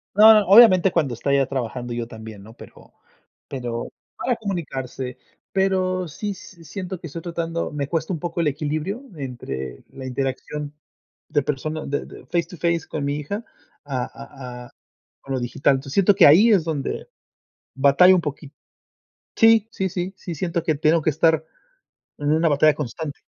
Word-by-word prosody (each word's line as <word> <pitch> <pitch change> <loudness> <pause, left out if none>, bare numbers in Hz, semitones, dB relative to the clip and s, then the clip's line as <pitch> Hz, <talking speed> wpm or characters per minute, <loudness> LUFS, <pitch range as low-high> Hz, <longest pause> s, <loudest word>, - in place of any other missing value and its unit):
No, 215 +2 +9
no, 210 -2 +4
obviamente 195 -3 +7
cuando 150 -8 0
está 130 +4 -2
ella 140 -1 +3
trabajando, 125 -2 -4
yo 120 -1 -3
también, 110 -3 -10
¿no? 110 +2 -13
Pero - - -15 0.6
pero 120 -3 -4 0.3
para 250 - -1
comunicarse, 135 - -5 0.3
pero 185 -1 +1
sí 205 +7 -5
s 185 -3 -10
siento 185 +3 -6
que 175 - -8
estoy 165 +2 -7
tratando 170 -1 -3
me 145 -2 -3
cuesta 165 +2 -2
un 165 - -4
poco 170 0 -3
el 165 - +1
equilibrio 155 - -2
entre 110 - -6
la 130 -1 -9
interacción 135 +3 -4 0.6
de 150 -2 +1
persona 155 +3 -3
de 145 +1 -2
de - - -13
face 170 -1 0
to 180 +2 -12
face 170 -1 0
con 150 - -3
mi 140 +1 -1
hija 200 +10 -5 0.4
a 135 -3 -2
a 125 -2 -10
a - - -17 0.5
con 135 - -6
lo - - -1
digital. 125 +3 +1
Entonces, 135 +1 -6
siento 200 0 +4
que 185 - +7
ahí 185 +11 +7
es 195 -6 +4
donde 150 -4 -3 0.7
batallo 140 +7 +6
un 180 - +2
poqui 145 -2 -6 0.9
sí, 225 -1 +5
sí, 190 -4 -2
sí, 180 +1 -4
sí 175 -2 -6
siento 170 +1 -2
que 160 -2 +1
tengo 155 +3 +2
que 155 - +2
estar 160 +1 +2 0.7
en 145 0 -1
una 160 +2 +3
batalla 150 +1 +4
constante. 150 +2 -5
155 Hz, 175 wpm, -23 LUFS, 135-180 Hz, 0.9 s, No